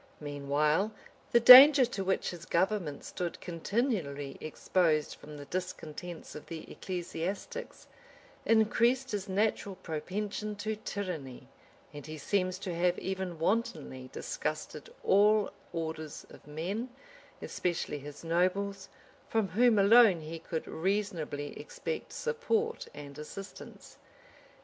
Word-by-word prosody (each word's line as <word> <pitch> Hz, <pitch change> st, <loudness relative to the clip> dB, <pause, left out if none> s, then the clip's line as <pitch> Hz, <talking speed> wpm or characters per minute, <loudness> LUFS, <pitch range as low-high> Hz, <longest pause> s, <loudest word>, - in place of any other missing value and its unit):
Meanwhile, 150 Hz, +7 st, 0 dB, 0.4 s
the 235 Hz, -, +6 dB
danger 260 Hz, +3 st, +11 dB
to 210 Hz, -5 st, -4 dB
which 190 Hz, 0 st, 0 dB
hia 175 Hz, -, -8 dB
government 170 Hz, -5 st, 0 dB
stood 175 Hz, -2 st, -4 dB
continually 170 Hz, -, -2 dB
exposed 155 Hz, -1 st, +1 dB
from 150 Hz, 0 st, -11 dB
the 145 Hz, -, -9 dB
discontents 175 Hz, 0 st, -6 dB
of 150 Hz, -, -10 dB
the 165 Hz, -1 st, -8 dB
ecclesiastics, 185 Hz, -, -5 dB, 0.6 s
increased 235 Hz, +4 st, +3 dB
his 205 Hz, -1 st, -3 dB
natural 200 Hz, 0 st, 0 dB
propension 200 Hz, +5 st, -4 dB
to 215 Hz, +2 st, -3 dB
tyranny; 180 Hz, -11 st, -6 dB, 0.5 s
and 145 Hz, 0 st, -9 dB
he 155 Hz, 0 st, -6 dB
seems 185 Hz, +4 st, 0 dB
to 185 Hz, -2 st, -5 dB
have 175 Hz, +1 st, +1 dB
even 190 Hz, -2 st, -4 dB
wantonly 155 Hz, -, -2 dB
disgusted 155 Hz, -1 st, -4 dB
all 210 Hz, +1 st, +4 dB, 0.2 s
orders 160 Hz, -2 st, -5 dB
of -, -, -15 dB
men, 185 Hz, +11 st, -3 dB, 0.5 s
especially 170 Hz, -4 st, -2 dB
his 145 Hz, +2 st, -10 dB
nobles, 185 Hz, +4 st, 0 dB, 0.4 s
from 220 Hz, -4 st, +1 dB
whom 235 Hz, +2 st, +4 dB
alone 200 Hz, -3 st, +6 dB
he 160 Hz, +1 st, -7 dB
could 160 Hz, 0 st, -5 dB
reasonably 165 Hz, -6 st, -2 dB
expect -, -, -5 dB
support 465 Hz, -1 st, -1 dB
and 140 Hz, -1 st, -9 dB
assistance. 195 Hz, +6 st, -10 dB
185 Hz, 115 wpm, -31 LUFS, 155-210 Hz, 0.6 s, danger